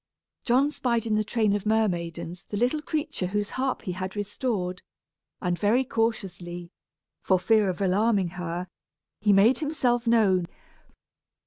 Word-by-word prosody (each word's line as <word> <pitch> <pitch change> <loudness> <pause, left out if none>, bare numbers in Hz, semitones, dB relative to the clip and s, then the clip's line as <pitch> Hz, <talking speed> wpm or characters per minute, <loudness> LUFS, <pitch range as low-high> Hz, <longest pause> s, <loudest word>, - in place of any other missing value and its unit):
John 265 +4 +3
spied 235 -5 0
in 220 - 0
the 215 0 +2
train 215 -2 +1
of 205 - -2
mermaidens 175 -5 -1
the 205 - -4
little 250 +7 +1
creature 300 - -2
whose 205 +2 -2
harp 260 0 -2
he 190 - -3
had 185 +2 -5
restored, 205 -3 -2 0.6
and 180 -2 -1
very 225 +5 +3
cautiously, 180 -8 -3 0.5
for 190 - +3
fear 205 +2 +3
of 185 +1 -4
alarming 195 0 +2
her, 180 0 -4 0.5
he 210 0 +3
made 205 +6 +5
himself 255 -6 0
known. 195 -7 +3
205 Hz, 140 wpm, -26 LUFS, 180-235 Hz, 0.6 s, made